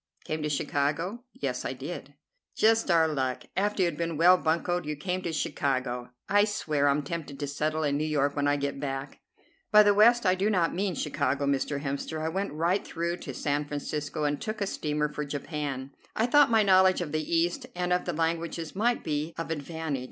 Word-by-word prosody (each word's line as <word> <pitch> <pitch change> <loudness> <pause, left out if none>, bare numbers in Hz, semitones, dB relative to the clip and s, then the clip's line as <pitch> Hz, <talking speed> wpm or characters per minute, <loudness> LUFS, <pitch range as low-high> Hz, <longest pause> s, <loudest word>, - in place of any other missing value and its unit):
"Came 155 0 -3
to 150 - -1
Chicago?" 150 - -1
"Yes, 130 - -3
I - - -3
did." 140 +1 -7 0.4
"Just 225 -1 +3
our 165 -2 +5
luck. 130 -4 -2
After 205 0 +1
you - - +4
had 170 -4 -2
been 165 -2 -2
well 175 +3 +7
buncoed 175 +1 0
you 150 - -2
came 180 +5 -3
to 170 - -3
Chicago. 130 -5 -1 0.2
I 205 0 +4
swear 155 -9 0
I'm 140 +1 +2
tempted 145 -2 -5
to 145 - -2
settle 155 +2 -1
in 145 -1 +1
New 150 - -1
York 145 -2 +1
when 145 0 +1
I 145 - +3
get 140 -1 -3
back." 135 -1 -4 0.5
"By 210 0 +8
the 205 0 +5
West 235 +3 +5
I 185 - +5
do 190 +3 +1
not 180 -5 +2
mean 190 0 -1
Chicago, 140 -2 -1
Mr. 140 +1 0
Hemster. 140 +3 -3
I 160 +1 -1
went 195 +4 -2
right 170 +6 +1
through 170 +1 -3
to 135 - -7
San 145 +2 0
Francisco 150 +1 -4
and 145 -1 0
took 215 -1 -4
a 200 - 0
steamer 150 -5 -1
for 150 0 -4
Japan. 140 -2 -4 0.2
I 220 - +2
thought 290 +2 +5
my 225 -2 +4
knowledge 185 -1 +5
of 160 -4 -4
the 155 0 0
East 170 +2 0
and 180 0 0
of 180 - 0
the 175 - -2
languages 165 0 -2
might 235 +4 +1
be 155 +1 -2
of 165 0 -4
advantage. 160 -1 -3
155 Hz, 210 wpm, -28 LUFS, 145-180 Hz, 0.5 s, By